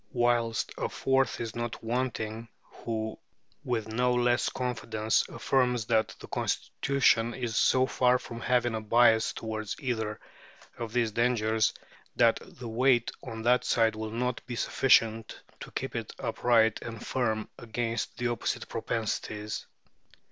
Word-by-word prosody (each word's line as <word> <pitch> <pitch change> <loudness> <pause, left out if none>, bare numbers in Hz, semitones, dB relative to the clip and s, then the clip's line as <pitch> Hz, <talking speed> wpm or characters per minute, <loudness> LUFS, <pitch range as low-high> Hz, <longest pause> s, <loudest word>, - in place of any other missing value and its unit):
Whilst 120 -2 +1
a - - -1
fourth 135 -2 +1
is 115 -1 -4
not 120 -1 -4
wanting, 115 -2 -2 0.2
who 110 -1 -4 0.4
with 115 -3 -1
no 125 +3 +1
less 120 0 +2
confidence 110 -3 0
affirms 125 -3 +1
that 110 -1 +1
the - - -10
Constitution 120 -4 +1
is 120 -3 -3
so 130 +1 +4
far 125 -1 +3
from 115 -1 -8
having 120 0 +2
a 110 - -2
bias 115 0 +4
towards 110 -2 -4
either 110 -6 -2 0.6
of 115 -2 -5
these 115 -2 +1
dangers, 110 -1 +2 0.4
that - - +4
the 120 - -10
weight 120 +1 +2
on 115 0 -7
that 125 +2 +4
side 115 -2 +2
will 110 0 -4
not 125 +2 -2
be 120 - -4
sufficient 115 -3 +2 0.2
to - - -8
keep - - -4
it - - -4
upright 115 -2 +2
and 115 -2 -7
firm 110 -4 -1
against 115 0 -3
the 120 0 0
opposite 120 - -2
propensities. 110 -1 -3
115 Hz, 140 wpm, -29 LUFS, 110-125 Hz, 0.6 s, so